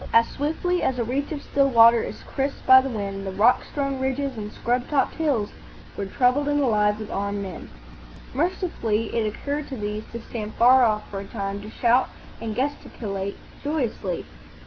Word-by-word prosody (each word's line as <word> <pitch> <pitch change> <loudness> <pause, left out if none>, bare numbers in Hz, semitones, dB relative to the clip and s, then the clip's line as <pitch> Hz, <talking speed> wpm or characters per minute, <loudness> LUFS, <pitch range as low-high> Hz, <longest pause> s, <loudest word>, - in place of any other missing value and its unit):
As 230 0 +5
swiftly 320 +5 -1
as 260 - 0
a 240 - +1
reach 270 +6 -2
of 295 -2 -4
still 275 -1 +2
water 230 -1 +7
is - - -6
crisped 275 +1 -3
by 260 0 +9
the 270 - -3
wind, 200 -4 -4
the 195 - -4
rock 220 +6 +4
strewn 275 -2 -3
ridges 265 +1 -1
and 210 -1 -6
scrub 245 +1 -1
topped 290 -2 +1
hills 280 -10 0 0.4
were 200 - -3
troubled 255 +7 +2
and 290 0 +2
alive 210 -6 +2
with 215 -1 -7
armed 200 0 -2
men. 190 -3 -8 0.6
Mercifully, 275 - -1
it 225 -2 +1
occurred 285 +7 -3
to 265 - -6
these 210 0 -3
to 235 - -5
stand 220 -2 -6
far 255 +2 +6
off 215 -2 +1
for 195 - -4
a 200 - -7
time, 200 -2 -4
to 210 - -9
shout 240 +3 +2 0.3
and 220 -2 -4
gesticulate 210 -7 -3 0.3
joyously. 250 - -2
235 Hz, 185 wpm, -24 LUFS, 210-275 Hz, 0.6 s, by